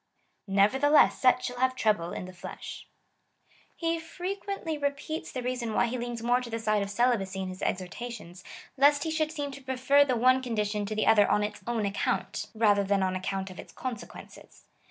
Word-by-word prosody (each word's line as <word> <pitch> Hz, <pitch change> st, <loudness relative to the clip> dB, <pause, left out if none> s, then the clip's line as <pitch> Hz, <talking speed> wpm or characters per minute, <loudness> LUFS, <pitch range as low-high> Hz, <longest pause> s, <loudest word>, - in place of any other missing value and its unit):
Nevertheless 260 Hz, +10 st, +4 dB
such 255 Hz, -1 st, +4 dB
shall 245 Hz, 0 st, -5 dB
have 260 Hz, 0 st, +2 dB
trouble 205 Hz, -8 st, +1 dB
in -, -, -5 dB
the 185 Hz, -, -10 dB
flesh. 180 Hz, -, -9 dB, 0.9 s
He 330 Hz, 0 st, -1 dB
fre 350 Hz, +4 st, -4 dB
quently 395 Hz, -7 st, -5 dB
repeats 285 Hz, +3 st, -3 dB
the 255 Hz, -, -4 dB
reason 245 Hz, -3 st, -2 dB
wh}' -, -, +4 dB
he 250 Hz, +2 st, -3 dB
leans 240 Hz, -1 st, -4 dB
more 245 Hz, +1 st, +3 dB
to 245 Hz, -, -7 dB
the 230 Hz, -, -2 dB
side 215 Hz, -2 st, +1 dB
of 200 Hz, -, -3 dB
celibacy 205 Hz, -4 st, +1 dB
in 190 Hz, -1 st, -3 dB
his 185 Hz, +1 st, -8 dB
exhortations, 185 Hz, 0 st, -5 dB, 0.3 s
lest 285 Hz, +1 st, +5 dB
he 320 Hz, -, -2 dB
should 310 Hz, -1 st, 0 dB
seem 290 Hz, -3 st, -4 dB
to 275 Hz, 0 st, -10 dB
prefer 265 Hz, +2 st, +3 dB
the 255 Hz, -4 st, 0 dB
one 255 Hz, +2 st, +4 dB
condition 210 Hz, -4 st, -2 dB
to 215 Hz, -, -3 dB
the 215 Hz, -, +1 dB
other 210 Hz, -2 st, +5 dB
on 210 Hz, -, +3 dB
its 210 Hz, -, -4 dB
own 230 Hz, -3 st, 0 dB
account, 200 Hz, 0 st, -2 dB
rather 205 Hz, -2 st, +4 dB
than 195 Hz, 0 st, +1 dB
on 185 Hz, 0 st, 0 dB
account 190 Hz, +1 st, -3 dB
of 185 Hz, -, -11 dB
its -, -, -10 dB
consequences. 245 Hz, -3 st, -9 dB
240 Hz, 195 wpm, -28 LUFS, 205-270 Hz, 0.9 s, lest